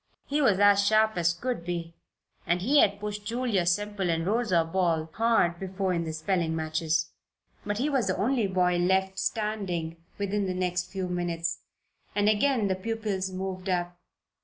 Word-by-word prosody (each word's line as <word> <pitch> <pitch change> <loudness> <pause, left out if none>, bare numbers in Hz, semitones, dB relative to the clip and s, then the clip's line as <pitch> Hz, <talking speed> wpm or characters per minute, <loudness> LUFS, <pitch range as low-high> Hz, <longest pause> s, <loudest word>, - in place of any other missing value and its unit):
He 295 +1 0
was 220 -9 +4
as 200 0 +5
sharp 220 +1 +3
as 175 -1 +2
could 235 +2 -3
be 170 -1 -4 0.5
and 175 +1 +1
he 285 +7 +4
had 200 -4 +3
pushed 210 0 -5
Julia 225 -5 0
Semple 205 0 0
and 165 0 0
Rosa 205 -5 +2
Ball 165 -2 0
hard 225 -7 +2
before 190 0 -2
in 170 -1 -1
the 160 - -3
spelling 160 +1 -1
matches. 160 0 -1 0.6
But 205 0 -1
he 260 +6 0
was 270 -7 +1
the 185 - 0
only 235 0 +1
boy 180 -2 +2
left 190 +2 +1
standing 190 -7 -2 0.2
within 200 0 -1
the 185 - -2
next 180 -1 -1
few 190 -2 -3
minutes, 170 -1 -2 0.6
and 205 0 +2
again 215 +1 +2
the 190 - +1
pupils 205 -2 -2
moved 190 0 -5
up. 175 -1 -1
190 Hz, 170 wpm, -27 LUFS, 175-210 Hz, 0.6 s, as